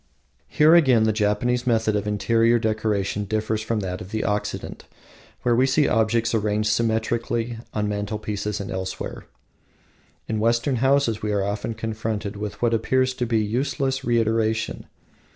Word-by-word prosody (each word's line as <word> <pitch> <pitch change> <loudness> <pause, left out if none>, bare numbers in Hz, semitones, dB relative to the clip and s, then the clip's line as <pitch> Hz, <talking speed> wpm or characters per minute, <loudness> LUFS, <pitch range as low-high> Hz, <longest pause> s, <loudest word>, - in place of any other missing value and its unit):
Here 155 +2 +5
again 130 -10 +5
the 110 0 +2
Japanese 115 +4 0
method 110 -3 +2
of 105 0 -1
interior 115 +3 +2
decoration 110 -2 -1
differs 110 +1 -1
from 110 0 -2
that 90 -1 -4
of 95 - -8
the 110 +1 -2
Occident, 105 +1 -3 0.6
where 120 -1 +3
we 130 +3 +3
see 145 +2 +3
objects 115 +1 +1
arrayed 105 -1 0
symmetrically 115 +1 0
on 105 -1 -1
mantelpieces 105 0 -3
and 100 - -5
elsewhere. 95 0 -5 1.0
In 110 - -1
Western 115 +4 +1
houses 130 -3 +2
we 105 - -2
are 100 -1 +1
often 105 +3 -3
confronted 110 -1 -3
with 105 0 -6
what 115 -1 +3
appears 130 +3 +1
to 125 -1 -2
us - - -11
useless 135 +4 -1
reiteration. 115 -2 0
110 Hz, 150 wpm, -23 LUFS, 105-120 Hz, 1.0 s, Here